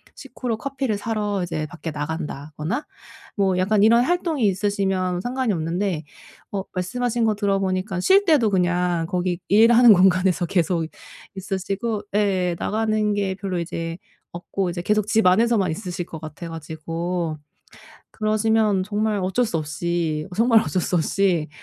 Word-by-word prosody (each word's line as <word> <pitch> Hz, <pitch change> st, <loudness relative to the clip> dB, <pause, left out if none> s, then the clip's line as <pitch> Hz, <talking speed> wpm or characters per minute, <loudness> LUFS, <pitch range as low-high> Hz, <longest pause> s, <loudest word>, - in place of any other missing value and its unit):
식후로 240 Hz, -4 st, -5 dB
커피를 265 Hz, -3 st, -2 dB
사러 210 Hz, -3 st, -2 dB
이제 160 Hz, -3 st, -3 dB
밖에 175 Hz, -2 st, -7 dB
나간다거나 155 Hz, -, -4 dB, 0.5 s
뭐 190 Hz, -2 st, +2 dB
약간 200 Hz, +3 st, +2 dB
이런 230 Hz, +2 st, +6 dB
활동이 325 Hz, -4 st, 0 dB
있으시면 190 Hz, -2 st, 0 dB
상관이 250 Hz, +1 st, -1 dB
없는데 170 Hz, 0 st, -2 dB, 0.5 s
어 195 Hz, -2 st, -2 dB
말씀하신 235 Hz, +6 st, -1 dB
거 220 Hz, -, +2 dB
들어보니까 195 Hz, -2 st, -1 dB
쉴 395 Hz, -, +4 dB
때도 290 Hz, -, +4 dB
그냥 180 Hz, -2 st, +1 dB
거기 180 Hz, 0 st, -1 dB
일하는 230 Hz, +2 st, +7 dB
공간에서 185 Hz, -1 st, +3 dB
계속 170 Hz, -1 st, 0 dB, 0.5 s
있으시고 195 Hz, +3 st, -3 dB
예 185 Hz, -4 st, +1 dB
나가는 215 Hz, -1 st, 0 dB
게 200 Hz, -2 st, -1 dB
별로 190 Hz, -2 st, -4 dB
이제 165 Hz, 0 st, -4 dB, 0.3 s
없고 180 Hz, +2 st, -3 dB
이제 175 Hz, 0 st, -4 dB
계속 210 Hz, +1 st, +1 dB
집 225 Hz, -1 st, +2 dB
안에서만 205 Hz, -1 st, +3 dB
있으실 175 Hz, 0 st, -5 dB
것 160 Hz, -3 st, -9 dB
같아 160 Hz, +2 st, -8 dB
가지고 165 Hz, +1 st, -4 dB, 0.7 s
그러시면 215 Hz, -2 st, +1 dB
정말 210 Hz, +1 st, -1 dB
어쩔 190 Hz, +6 st, +1 dB
수 175 Hz, -8 st, -2 dB
없이 155 Hz, 0 st, -2 dB
정말 230 Hz, 0 st, +5 dB
어쩔 185 Hz, -3 st, -1 dB
수 180 Hz, -, 0 dB
없이 175 Hz, -1 st, +1 dB
190 Hz, 315 characters per minute, -23 LUFS, 175-215 Hz, 0.7 s, 일하는